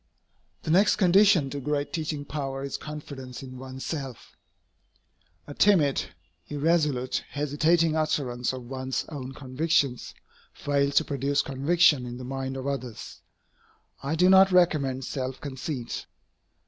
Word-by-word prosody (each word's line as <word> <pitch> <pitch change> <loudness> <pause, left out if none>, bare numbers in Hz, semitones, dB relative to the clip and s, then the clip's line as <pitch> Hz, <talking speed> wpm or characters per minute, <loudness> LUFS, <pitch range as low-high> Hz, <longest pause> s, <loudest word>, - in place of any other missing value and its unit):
The - - -2
next 195 +5 +5
condition 190 -6 +4
to 145 - -4
great 145 +1 -2
teaching 155 -2 -3
power 135 -2 -4
is 140 - -4
confidence 140 -4 -8
in 130 -1 -9
one's 130 0 -8
self. 135 -7 -6 1.1
A 145 - -8
timid, 155 -7 +3 0.4
irresolute, 150 -4 0
hesitating 155 +3 +2
utterance 140 -6 0
of 130 -1 -7
one's 130 +1 -3
own 135 -4 -6
convictions 140 -1 0 0.4
fails 140 -1 0
to - - +5
produce 140 0 0
conviction 140 0 +3
in 120 0 -6
the 125 - -8
minds 135 0 -4
of 130 - -6
others. 130 -5 -5 0.8
I 140 +4 -2
do 180 +3 +4
not 190 0 +7
recommend 140 -8 +2
self 130 -1 -4
conceit. 130 -3 -5
140 Hz, 130 wpm, -27 LUFS, 130-155 Hz, 1.1 s, not